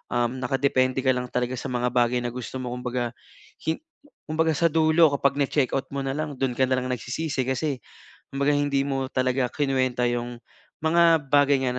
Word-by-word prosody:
nakadepende 130 +2 +1
ka 130 - +4
lang 125 0 -3
talaga 125 +1 -1
sa - - -5
mga 125 0 0
bagay 125 0 +2
na 120 - -2
gusto 125 +1 -7
mo. 125 -1 -4
Kumbaga 125 -1 -3 0.6
hi 160 - +2 0.5
kumbaga 160 +1 +2
sa 165 +3 +3
dulo, 160 0 +4
kapag 140 -1 +1
na-checkout 135 -1 0
mo 140 - -2
na, 135 - -1
lang 155 -1 -3
dun 135 -2 0
ka 130 - +3
nalang 130 0 0
nagsisisi 130 +3 -2
kasi 130 +2 -1 0.6
kumbaga 140 +1 +1
hindi 145 -1 +1
mo 135 -1 -1
talaga 130 0 +1
kinuwenta 130 -3 0
'yung 120 0 -4 0.4
mga 165 -1 +4
bagay 145 -1 +4
na 125 - -3
130 Hz, 175 wpm, -25 LUFS, 125-145 Hz, 0.6 s, ka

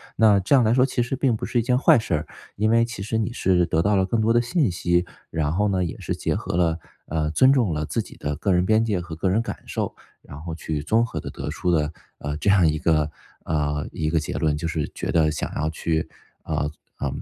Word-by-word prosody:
那 105 -3 +5
这 100 +9 +3
样 130 - +5
来 110 0 +3
说， 130 +1 +4
其 125 -2 0
实 125 +3 -3
并 130 -3 +2
不 - - -4
是 120 - 0
一 - - +3
件 125 +2 +2
坏 125 - +5
事 110 -5 -3
儿， 75 - -3 0.3
因 110 +1 +1
为 115 +1 +4
其 120 -4 -6
实 110 +2 -1
你 110 +2 -1
是 90 -5 +2
得 80 -1 +1
到 100 +3 +2
了 95 - +3
更 110 +4 0
多 110 +1 +2
的 120 - +4
信 125 - +1
息。 85 0 +1 0.2
然 75 -2 -1
后 105 +6 +1
呢， 95 -2 +1
也 85 - -4
是 - - -3
结 - - -1
合 - - -3
了 85 -2 +1 0.3
呃， 75 -1 -1
尊 130 - +5
重 120 -11 +2
了 75 0 -2
自 - - -1
己 - - -12
的 75 0 -3
个 100 - +1
人 90 0 +2
边 110 +3 +3
界 100 -5 0
和 85 -2 -7
个 95 +3 0
人 105 +5 +2
感 115 - -5
受， - - -3 0.3
然 70 - -11
后 80 0 -5
去 80 -2 -3
综 110 +10 +2
合 115 - -5
地 - - -6
得 - - -6
出 90 - -2
了， 75 -3 +1 0.3
呃， 75 0 -4
这 100 - 0
样 95 -4 +5
一 75 0 +1
个， 75 -1 +2 0.4
呃， 75 -2 -1
一 75 - -2
个 80 0 +2
结 75 - -4
论， 75 -2 +1
就 80 - -3
是 80 -2 -2
觉 - - -3
得 80 -2 +3
想 80 - -4
要 75 +1 0
去， 80 0 -1 0.4
呃， 75 - -1 0.3
嗯， - - -3
90 Hz, 280 characters per minute, -24 LUFS, 80-110 Hz, 0.4 s, 那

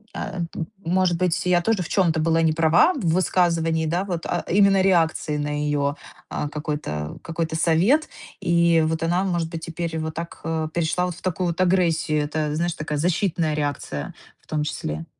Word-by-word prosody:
э, 195 -2 -4
т - - -8 0.3
может 180 0 +2
быть, 180 -1 0
я 180 -1 +3
тоже 200 0 +1
в - - -8
чём-то 170 -5 +2
была 165 +1 +2
не 160 - +3
права 165 - +4
в 280 - -5
высказывании. 165 -2 +2
Да, 175 +4 0
вот, 175 -4 -4
а - - -1
именно 195 0 +5
реакции 165 -5 +2
на 145 0 -2
ее, 145 -1 0 0.3
а, - - -3
какой-то 150 - -4
какой-то 165 -1 -3
совет. 175 - +3 0.3
И 170 -1 +3
вот 160 +1 -1
она, 175 +3 +1
может 175 -4 -1
быть, 165 -1 -6
теперь 165 0 -4
вот 160 0 -3
так, 170 +1 -7
э, 160 -1 -1
перешла 170 +1 0
вот 180 - -5
в - - -14
такую 185 0 -1
вот 170 +2 -2
агрессию. 165 -4 +2
Это, 150 0 -2
знаешь, 170 +2 0
такая 155 -2 -3
защитная 170 -1 0
реакция 145 - -3 0.3
в - - -31
том 150 -1 -1
числе. 80 - -4
165 Hz, 185 wpm, -23 LUFS, 155-180 Hz, 0.3 s, именно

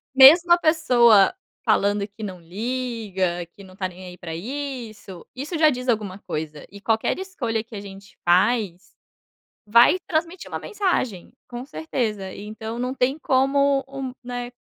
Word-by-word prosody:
Mesmo 325 +7 +8
a 345 - +7
pessoa 250 - +5 0.3
falando 200 0 +2
que 215 +1 -14
não 185 -4 -6
liga, 200 -3 -3
que 200 - -12
não 185 - -15
está 185 -1 -3
nem 185 +1 -12
aí 180 0 -11
para 165 -2 -6
isso, 230 -5 -7
isso 300 +6 -4
já 310 -1 +6
diz 250 -1 -5
alguma 205 -4 -1
coisa, 155 -4 -6
e 200 - -11
qualquer 225 - 0
escolha 240 - -3
que 230 - -14
a 205 - -5
gente 195 0 -12
faz, 185 +1 +2 0.7
vai 235 - +6
transmitir 335 +2 -2
uma - - -3
mensagem, 355 - -2 0.2
com 245 0 -6
certeza. 220 -10 -3
Então, 220 +2 -7
não 250 +1 -2
tem 270 +3 0
como 275 0 +2
um, 270 -1 -5
né, 245 0 -5
235 Hz, 155 wpm, -23 LUFS, 195-270 Hz, 0.7 s, Mesmo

